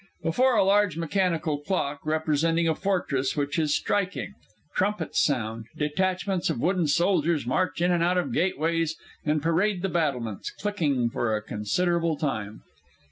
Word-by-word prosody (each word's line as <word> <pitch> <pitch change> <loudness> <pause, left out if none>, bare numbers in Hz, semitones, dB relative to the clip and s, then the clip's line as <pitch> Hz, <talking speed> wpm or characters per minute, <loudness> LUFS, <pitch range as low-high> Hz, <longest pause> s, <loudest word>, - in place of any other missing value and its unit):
_ - - +1
_Before 255 +5 +3
a - - +5
large 200 -3 +3
mechanical 165 -3 0
clock, 145 -3 -2
representing 160 +2 +1
a 160 - +3
fortress, 155 -8 -1
which 145 +2 0
is 150 -2 +2
striking. 200 0 -1 0.4
Trumpets 195 -3 0
sound, 115 -5 -1
detachments 185 +4 0
of - - -1
wooden 175 +2 +1
soldiers 170 -2 +2
march 165 +5 0
in 180 - +3
and 175 -1 +2
out 180 +1 +2
of 180 - -1
gateways, 165 -1 0 0.3
and 150 -1 0
parade 180 +3 +1
the 195 - 0
battlements, 130 - -1
clicking 145 - -1
for 110 -2 0
a 105 - -2
considerable 165 - 0
time. 110 -8 -3
165 Hz, 150 wpm, -26 LUFS, 145-185 Hz, 0.4 s, a